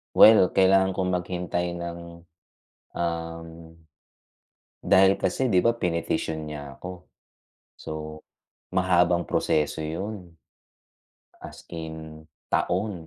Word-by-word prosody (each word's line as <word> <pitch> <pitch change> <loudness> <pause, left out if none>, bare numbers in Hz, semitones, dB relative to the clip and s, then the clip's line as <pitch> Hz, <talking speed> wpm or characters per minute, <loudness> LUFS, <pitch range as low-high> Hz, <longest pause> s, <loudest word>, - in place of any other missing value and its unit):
Well 105 -4 +8
kailangan 95 0 +4
kong 90 -1 -1
maghintay 90 0 -2
ng, 85 0 -6 0.9
um, 85 -1 -3 1.4
dahil 95 +1 +5
kasi 130 +8 0
'di 90 - +4
ba 115 0 +2
pinetisyon 80 -2 -2
niya 70 -2 -7
ako, 90 0 -9 0.7
so 75 0 -7 0.5
mahabang 90 -2 +2
proseso 75 +1 0
yun. 90 +1 -6 1.0
As - - -11
in 80 -1 -8 0.2
taon 90 -2 -1
85 Hz, 90 wpm, -25 LUFS, 80-95 Hz, 1.4 s, Well